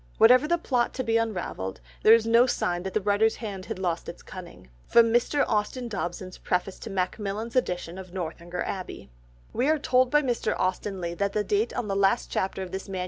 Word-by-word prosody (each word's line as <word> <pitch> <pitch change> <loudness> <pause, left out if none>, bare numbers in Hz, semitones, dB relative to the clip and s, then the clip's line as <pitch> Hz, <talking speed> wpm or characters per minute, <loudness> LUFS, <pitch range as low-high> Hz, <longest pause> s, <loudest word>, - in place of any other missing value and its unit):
Whatever 250 +5 +6
the 345 +2 +2
plot 250 -7 0
to 260 - -2
be 230 -1 +2
unravelled, 180 - -3 0.2
there 220 - +8
is 230 -1 0
no 230 +2 +5
sign 175 -7 -1
that 190 0 -6
the 215 - +2
writer's 205 +2 +2
hand 200 -5 -6
had - - -4
lost 175 -3 -2
its - - -10
cunning." 175 - -11 0.2
(Mr. 235 +5 +4
Austin 230 +3 -1
Dobson's 185 -3 -5
preface 180 +1 -2
to - - -7
Macmillan's 200 +4 -3
edition 180 -7 -1
of 185 -2 -10
Northanger 175 0 -4
Abbey.) 180 - -6 0.4
We 260 +4 +1
are 315 - +4
told 255 -3 +2
by 295 +2 +3
Mr. 240 -4 0
Austen 185 +1 -2
Leigh 170 0 -3
that 200 0 0
the 210 - +1
date 210 +3 0
on 245 -3 -2
the 195 - -1
last 200 +4 +2
chapter 190 0 -1
of 180 - -8
this 190 +1 -6
MS. 190 -1 -4
205 Hz, 205 wpm, -26 LUFS, 185-235 Hz, 0.4 s, there